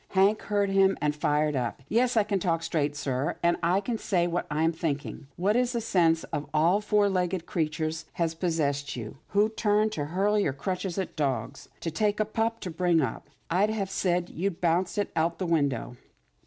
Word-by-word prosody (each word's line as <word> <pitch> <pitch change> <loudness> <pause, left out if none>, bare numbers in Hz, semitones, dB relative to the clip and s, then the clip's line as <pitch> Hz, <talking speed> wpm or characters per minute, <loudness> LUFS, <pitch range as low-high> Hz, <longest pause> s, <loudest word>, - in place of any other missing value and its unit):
Hank 200 +3 +4
heard 205 -1 0
him 195 0 +4
and 150 -1 0
fired 150 0 +1
up. 125 +1 -3
" - - -38
Yes 240 +4 +2
I 215 - +5
can 200 -1 -1
talk 165 -3 0
straight, 145 -2 -1
sir, 135 -1 -1
and 170 0 +4
I'll 180 +4 +2 0.2
say 175 -4 +1
what 175 0 -2
I'm 160 +2 +2
thinking. 150 -3 -4
What, 195 +5 +1
in 250 - +4
the 235 -2 -3
name 165 -3 +5 0.2
of 145 -1 -3
all 170 +7 +4
four 210 -1 +3
legged 180 -2 -1
creatures, 160 0 -2
has 165 -2 0
pos 170 +1 -1
sessed 140 -2 -1
you, 115 0 -7
who 210 +2 +2
used 210 0 +2
to 145 -6 -2
hurl 195 +7 +1
your 145 -9 +1
crutches 185 +4 -3
at 190 - -3
dogs, 140 -4 -2
to 165 - -2
take 210 +5 0
a 215 - +2
pup 225 +1 -1
to 180 - -4
bring 175 0 +2
up? 145 0 -3 0.2
I'd 195 +5 +3
have 200 -3 -2
said 180 -2 0
you'd 180 +1 -2
bounce 175 +3 +1
it 205 - -1
out 165 +1 +1
the 185 - -2
window." 140 -7 0
175 Hz, 205 wpm, -27 LUFS, 155-200 Hz, 0.2 s, I